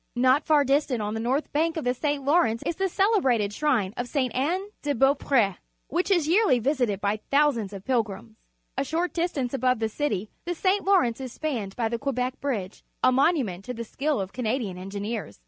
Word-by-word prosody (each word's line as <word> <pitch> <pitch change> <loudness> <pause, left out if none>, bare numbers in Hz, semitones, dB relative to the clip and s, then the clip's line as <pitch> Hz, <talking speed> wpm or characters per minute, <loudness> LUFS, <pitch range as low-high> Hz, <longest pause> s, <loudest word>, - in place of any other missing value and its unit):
Not 255 +4 +4
far 295 -2 +4
dis 280 +3 +2
tant 250 -4 -2
on 210 0 -2
the 225 - -3
north 260 +6 -1
bank 325 +3 +1
of 320 - -2
the 250 0 +1
St. 290 +1 -2
Lawrence 260 -7 +2
is 335 - -1
the 385 0 0
celebrated 305 - +2
skrine 225 -7 0
of 245 - -3
S(e. 255 -1 0
Anne 350 +10 -1
de 290 -1 -1
Beau 270 +3 +5
pr 280 0 -3
e^ 200 -7 +3 0.3
which 350 +7 0
is 345 -6 +3
j'earlj' 320 - +3
^^sited 250 -7 +1
bj^ 205 +2 -1
thousands 275 -8 +2
of 195 -1 -9
pilgrims. 225 -3 -1 0.4
A 270 - 0
short 330 +5 -1
distance 305 -8 -1
above 255 -1 +2
the 225 - -1
cit^^ 220 -4 -2 0.2
the 350 0 -2
St. 385 +4 +1
Lawrence 345 - +2
is 255 -2 -6
spanned 235 -11 -3
by 235 -2 0
the 230 +1 -3
Quebec 255 -1 -2
Bridge, 215 -9 -3 0.2
a - - +6
monument 255 - +1
to 250 - -5
the 230 - -4
skill 285 +5 -1
of 190 -1 -4
Canadian 230 -5 -2
en 190 +1 -7
gineers. 205 - -5
255 Hz, 215 wpm, -26 LUFS, 225-300 Hz, 0.4 s, a